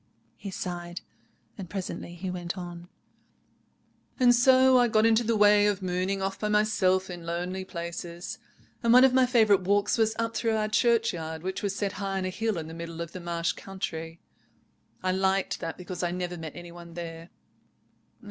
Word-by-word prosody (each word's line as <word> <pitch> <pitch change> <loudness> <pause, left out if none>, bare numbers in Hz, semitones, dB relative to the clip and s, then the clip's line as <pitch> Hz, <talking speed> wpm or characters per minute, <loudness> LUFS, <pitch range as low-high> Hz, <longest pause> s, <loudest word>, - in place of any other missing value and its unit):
He 200 - -7
sighed. 175 -2 -5 0.7
Presently 185 -2 -5
he 180 +1 -4
went 175 0 -5
on— 175 -1 -8 1.3
"And 245 -1 +6
so 260 +1 +6
I 245 - +4
got 220 -1 +3
into 225 +1 +4
the 230 0 +1
way 205 0 +6
of 200 -2 -1
mooning 185 +2 -1
off 195 0 -3
by 210 - -1
myself 205 -3 +2
in 175 -2 -7
lonely 175 +3 -3
places, 170 0 -6 0.4
and 235 0 +4
one 250 +1 +8
of 265 -1 +5
my 260 -1 +5
favourite 220 -6 +4
walks 205 +4 +1
was 220 0 +2
up 230 0 -2
through 225 -2 +1
our 215 0 0
churchyard, 200 -8 +1
which 190 +1 -3
was 200 -1 -2
set 200 -1 -1
high 195 0 -3
on 190 - -2
a - - -1
hill 220 +1 -1
in 160 -1 -5
the 160 - -8
middle 165 0 -7
of 170 -1 -5
the 185 - -7
marsh 170 -1 -1
country. 165 -4 -6 0.8
I 185 - +1
liked 190 +1 +1
that 165 -1 -5
because 180 0 -6
I 175 - 0
never 180 0 -3
met 160 -3 -7
any 175 0 -9
one 170 -1 -12
there. 165 0 -7
185 Hz, 185 wpm, -28 LUFS, 175-215 Hz, 1.3 s, one